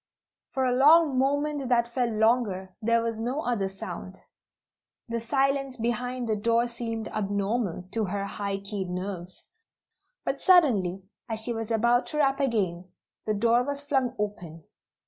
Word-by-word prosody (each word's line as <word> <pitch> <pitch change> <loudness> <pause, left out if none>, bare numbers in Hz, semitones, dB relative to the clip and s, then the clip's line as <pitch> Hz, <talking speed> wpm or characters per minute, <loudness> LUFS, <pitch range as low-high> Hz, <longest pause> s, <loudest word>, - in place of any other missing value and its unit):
For 265 -1 +2
a 250 - +2
long 290 +1 +6
moment 285 0 0
that 235 -1 +2
felt 245 -2 +1
longer 215 -4 +1
there 230 +1 +2
was 230 -1 -2
no 250 +6 -2
other 220 -6 0
sound. 185 -1 -8 0.9
The 230 0 -2
silence 275 +2 0
behind 245 +1 -2
the 220 - +1
door 230 +3 +2
seemed 230 -2 -4
abnormal 200 -2 -2
to 225 -2 0
her 200 +1 -2
high 200 0 -3
keyed 200 -2 -4
nerves. 180 -1 -5 0.8
But - - -2
suddenly, 215 - +4 0.3
as 220 -1 -2
she 235 +2 -3
was 225 -1 -4
about 235 +2 +2
to 300 - -5
rap 275 -2 +2
again, 190 -9 0 0.4
the 215 - +1
door 230 +3 +3
was 285 +2 -3
flung 265 -4 0
open. 175 -6 -5
230 Hz, 150 wpm, -27 LUFS, 200-255 Hz, 0.9 s, long